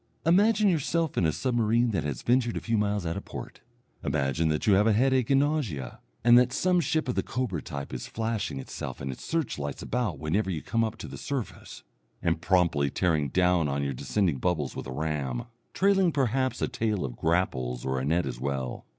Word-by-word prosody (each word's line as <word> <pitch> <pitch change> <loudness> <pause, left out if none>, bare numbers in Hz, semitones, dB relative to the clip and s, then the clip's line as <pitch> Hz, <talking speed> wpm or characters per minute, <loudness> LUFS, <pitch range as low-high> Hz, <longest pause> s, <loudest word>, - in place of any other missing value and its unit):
Imagine 205 +5 +4
yourself 165 -2 +1
in 85 - +2
a - - +2
submarine 115 +5 +1
that 100 - -1
has 75 -4 -4
ventured 120 -1 +2
a - - 0
few 115 - -1
miles 105 -3 0
out 80 - -2
of - - -5
port, - - -8 0.4
imagine 70 +4 0
that 75 0 0
you 105 - +5
have 105 +3 +4
headache 125 +3 +3
and 135 0 +5
nausea, 115 - -2 0.2
and 120 +1 +8
that 125 0 +2
some 180 +4 +2
ship 155 -1 0
of 125 - 0
the - - +1
Cobra 115 - -3
type 70 -2 -6
is - - -5
flashing 110 -8 -2
itself 65 - -6
and 70 -1 -3
its 65 - -9
search 160 - -2
lights 70 -1 -4
about 120 -9 -1
whenever 95 +6 0
you 80 -5 -3
come 115 -1 +1
up 110 -1 -2
to - - -7
the - - -8
surface, 135 -5 -5 0.4
and 85 -1 0
promptly 85 -6 +2
tearing 75 -2 +1
down 90 -1 +3
on 70 0 -1
your 70 0 -1
descending 75 +5 0
bubbles 80 -4 -1
with - - -6
a - - -6
ram, 70 -3 -2 0.3
trailing 195 -2 +3
perhaps 130 -2 0
a - - +2
tail 105 -8 -1
of - - -6
grapples 65 -8 0
or 65 0 0
a - - -3
net 85 +5 +1
as - - -5
well. 65 -2 -3
95 Hz, 210 wpm, -28 LUFS, -, 0.4 s, and